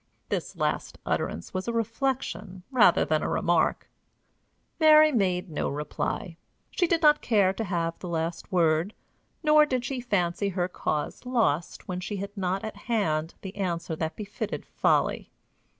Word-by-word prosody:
This - - -3
last - - -2
utterance 85 - -2
was 185 +3 -3
a - - 0
reflection 230 -4 -2
rather 230 -9 +5
than 155 -1 +1
a - - -1
remark. 170 -1 +1 0.9
Mary 310 -1 +7
made 185 - 0
no 150 - -1
reply. 165 +5 -3 0.3
She 355 - +1
did 335 0 +1
not 300 0 +6
care 200 -5 +3
to 225 - -3
have 170 -4 -2
the 180 - -7
last 165 0 -3
word; 170 +2 +2 0.5
nor 305 0 +6
did 255 -3 -1
she 260 -1 -3
fancy 200 -4 0
her 180 -2 -1
cause 155 -4 -3
lost 225 - 0
when 180 -2 -3
she 195 +3 -4
had 200 +2 -6
not 190 -1 -1
at 220 - -6
hand 165 -9 -1
the 190 -1 -8
answer 170 -4 -2
that 160 0 -3
befitted 210 +1 -5
folly. - - +1
195 Hz, 155 wpm, -27 LUFS, 170-230 Hz, 0.9 s, Mary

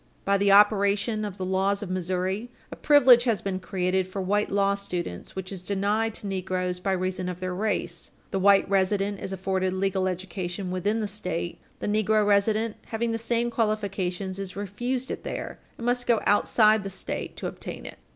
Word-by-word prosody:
By 200 0 +3
the 200 0 +4
operation 205 +1 +4
of 205 -2 -5
the 185 - -3
laws 195 +2 +1
of 185 - -5
Missouri, 185 +4 -2 0.2
a - - -6
privilege 260 -5 +6
has 230 -4 +2
been 190 -1 -3
created 185 +1 -1
for 185 +1 -6
white 205 +3 +1
law 200 0 +2
students 180 - -5
which 190 0 -5
is 190 -2 -6
denied 205 +4 0
to - - -9
negroes 185 -2 -2
by 195 +1 0
reason 185 0 -2
of 180 -1 -6
their 185 0 -3
race. 180 -3 -2 0.2
The 195 - 0
white 200 +1 +5
resident 195 +1 +1
is - - -5
afforded 190 0 -1
legal 190 0 0
education 185 0 -4
within 205 +5 0
the 210 - -1
State; 180 -4 -4 0.2
the - - -2
negro 215 0 +2
resident 210 +2 +2
having 230 +1 -1
the 225 - -1
same 235 +1 0
qualifications 195 -4 -1
is 195 -2 -5
refused 240 +6 -3
it - - -5
there, - - -5 0.2
and 235 - -6
must 245 0 0
go 235 -3 +4
outside 215 +1 +4
the 195 - -5
State 190 - -5
to - - -6
obtain - - -6
it. - - -9
195 Hz, 190 wpm, -26 LUFS, 185-215 Hz, 0.2 s, privilege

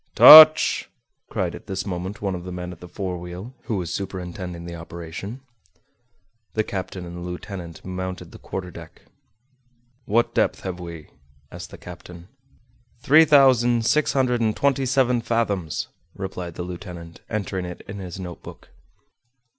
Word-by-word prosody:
"Touch!" 155 0 +9 0.4
cried - - -2
at - - -11
this 95 0 -3
moment 95 +2 -5
one 100 -1 -1
of 90 -1 -6
the 90 - -7
men 90 0 -6
at 90 - -11
the 90 - -11
forewheel, 90 +3 -6
who 110 -3 -2
was 90 -2 -4
superintending 90 -2 -6
the 85 - -7
operation. 85 +8 -8 1.1
The 110 - +2
captain 95 -2 -5
and 85 0 -8
the - - -7
lieutenant 90 -1 -8
mounted 95 0 -6
the - - -13
quarterdeck. 90 -3 -8 1.0
"What 115 +3 +1
depth - - +1
have 90 -1 -5
we?" 85 -3 -9 0.4
asked - - -9
the - - -11
captain. 90 +1 -12 0.7
"Three 155 +3 +7
thousand 125 -5 +4
six 150 +5 +2
hundred 125 -3 +1
and 110 -2 0
twenty 140 -1 +1
seven 125 -2 +2
fathoms," 105 -9 -2 0.3
replied 90 -3 -6
the 90 - -5
lieutenant, 85 -2 -9
entering 95 -3 -3
it 90 0 -8
in 100 0 -7
his 90 -1 -7
notebook. 90 -2 -10
95 Hz, 145 wpm, -23 LUFS, 90-115 Hz, 1.1 s, Touch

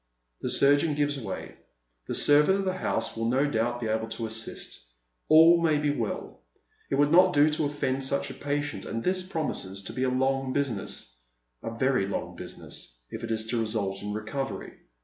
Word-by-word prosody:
The - - -3
surgeon 145 +2 +3
gives 145 -1 0
way. 100 -6 -6 0.5
The - - -2
servant 150 +6 +5
of 195 - -2
the 185 - 0
house - - -1
will 115 0 -1
no 130 +4 +2
doubt 120 -3 0
be 120 - -4
able 110 +1 -1
to 115 +1 -4
assist. 110 - -3 0.5
All 165 +2 +7
may 155 -3 +3
be 145 0 +1
well. 115 - -4 0.5
It - - +1
would 145 +1 +3
not 180 +1 +6
do 150 +1 +5
to 155 +1 0
oil'end 135 -2 -2
such 140 +1 0
a - - -7
patient, 145 0 -3
and 115 0 -4
this 185 0 +1
promises 150 - -3
to - - -6
be 130 - -4
a 130 - +2
long 130 +1 0
business 105 - -2 0.2
— - - -50
a - - -4
very 120 -2 +1
long 100 - -4
business - - -5
— - - -41
if 110 - -6
it 115 - -4
is 110 0 0
to 120 - 0
result 110 -3 -2
in 105 0 -4
recovery. 110 +6 -4
130 Hz, 200 wpm, -27 LUFS, 110-145 Hz, 0.5 s, All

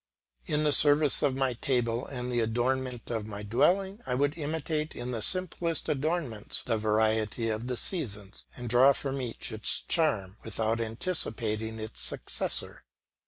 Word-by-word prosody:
In 150 0 +1
the 150 - +3
service 145 0 +7
of 140 -3 +2
my 135 -2 0
table 120 -1 -1
and 125 -2 -5
the 120 - +1
adornment 120 +2 -1
of 110 -2 -3
my 105 -1 -6
dwelling 190 - +1
I 125 - 0
would 145 +3 +1
imitate 155 0 -3
in 125 +1 -4
the 115 -3 -3
simplest 175 -1 +1
ornaments 145 -7 -2
the 115 -2 0
variety 110 +1 +1
of 110 +2 -3
the 125 -1 -2
seasons, 105 - -2
and 125 -1 -6
draw 125 +4 +6
from 135 0 -3
each 120 -1 -5
its 110 -1 -1
charm 110 - 0
without 110 +1 -1
anticipating 110 - -2
its 110 - -7
successor. - - -4
125 Hz, 155 wpm, -29 LUFS, 110-145 Hz, -, service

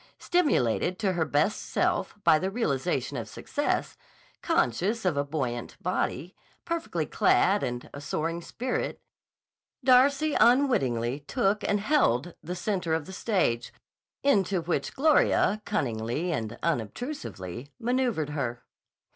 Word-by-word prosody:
Stimulated 185 - +1
to 195 -4 0
her 170 -2 +1
best 150 +7 +1
self - - -1
by 155 - +5
the 185 - -1
realization 180 - -1
of - - -5
success, 290 0 -2 0.4
conscious 230 - 0
of 180 -5 +2
a 140 - +1
buoyant 135 -5 -4
body, 165 +8 -2 0.3
perfectly 335 -1 -2
clad, 200 +1 +3
and 120 0 -3
a 145 - -7
soaring 165 +3 -2
spirit, 250 +8 -3 0.8
Darcy 275 +4 +4
unwittingly 140 - +3
took 205 - 0
and 205 - +1
held 175 - +2
the 175 +3 -5
center 180 -3 -1
of 160 -2 -3
the 190 - -9
stage, 185 - 0 0.5
into 195 -9 +2
which 170 +1 -2
Gloria 270 -7 +3
cunningly 120 +7 -1
and 115 -7 -3
unobtrusively 140 - -4
maneuvered 235 - 0
her. 125 -5 -3
175 Hz, 120 wpm, -28 LUFS, -, 0.8 s, by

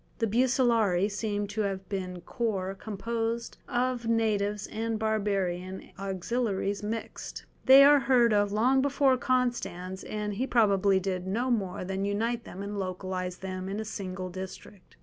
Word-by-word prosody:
The 230 - +1
Bucellarii 225 -5 +2
seem 205 0 -2
to 210 +1 -2
have 195 -2 -2
been 185 -3 -4
corps 195 -4 -2
composed 225 +3 -3
of 245 -1 -1
natives 210 -3 +1
and 225 +1 -2
barbarian 195 -4 -1
auxiliaries 195 +1 -1
mixed; 220 +2 -5 0.2
they 270 +1 +10
are 290 +1 +7
heard 240 -3 +4
of 205 -1 +2
long 250 +6 +3
before 275 -1 +3
Constans, 240 -8 -1
and 210 -1 -3
he 250 +7 -2
probably 200 -5 +4
did 185 -1 -3
no 240 +7 0
more 190 -6 -1
than 190 +1 -2
unite 225 +4 -1
them 190 +2 -7
and 205 0 -4
localize 185 -1 -3
them 185 0 -5
in 200 +2 -3
a 220 - -3
single 185 -3 -5
district. 190 +1 -9
205 Hz, 150 wpm, -29 LUFS, 190-235 Hz, 0.2 s, they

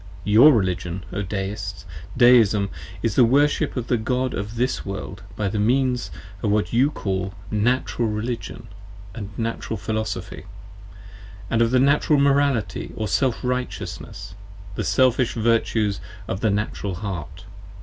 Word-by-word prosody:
Your 110 +9 +7
Religion, 95 - -1
O 100 - -2
Deists! 95 0 -4 0.3
Deism, 110 -5 +5 0.3
is 115 - +1
the 130 - +5
Worship 140 +4 +2
of 125 - -2
the 120 - +1
God 125 +3 -1
of 105 +3 -4
this 125 +3 -1
World 95 -1 -6
by 105 - -1
the 105 +2 -2
means 125 +3 +1 0.3
of 105 - 0
what 105 -2 0
you 130 +5 +4
call 95 -7 -3
25 - - -13
Natural 120 +2 +1
Religion 115 +1 -4 0.5
and 105 -4 -6
Natural 115 -1 -3
Philosophy, 110 0 -4 1.1
and 115 - +2
of 115 0 +3
Natural 140 +3 +3
Morality 140 -5 +1
or 110 - -2
Self 130 +2 0
Righteousness, 125 -6 -4 0.4
the - - -3
Selfish 130 -1 +2
Virtues 110 -3 +1 0.3
of 95 - -3
the 110 - +1
Natural 100 -2 -2
Heart. 90 -2 -6
110 Hz, 140 wpm, -23 LUFS, 100-125 Hz, 1.1 s, Your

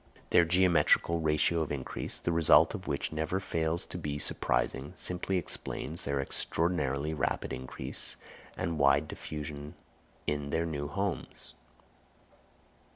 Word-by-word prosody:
Their 85 - +6
geometrical 85 -1 +4
ratio 80 +1 +2
of 75 - -2
increase, 70 -3 -4
the 85 - -2
result 80 -1 +6
of 95 -4 -6
which 70 - -1
never 80 +4 -1
fails 80 -3 -1
to - - -6
be 75 -1 -3
surprising, 70 -1 0
simply 90 +1 -1
explains 85 -2 -4
their 70 0 -1
extraordinarily 75 0 0
rapid 70 -2 -1
increase 65 0 -4 0.4
and 80 -2 -2
wide 70 +2 +4
diffusion 75 -1 -6 0.5
in 75 -1 -1
their 80 +2 0
new 75 -3 -3
homes. 80 -4 -4
80 Hz, 125 wpm, -31 LUFS, 70-85 Hz, 0.5 s, Their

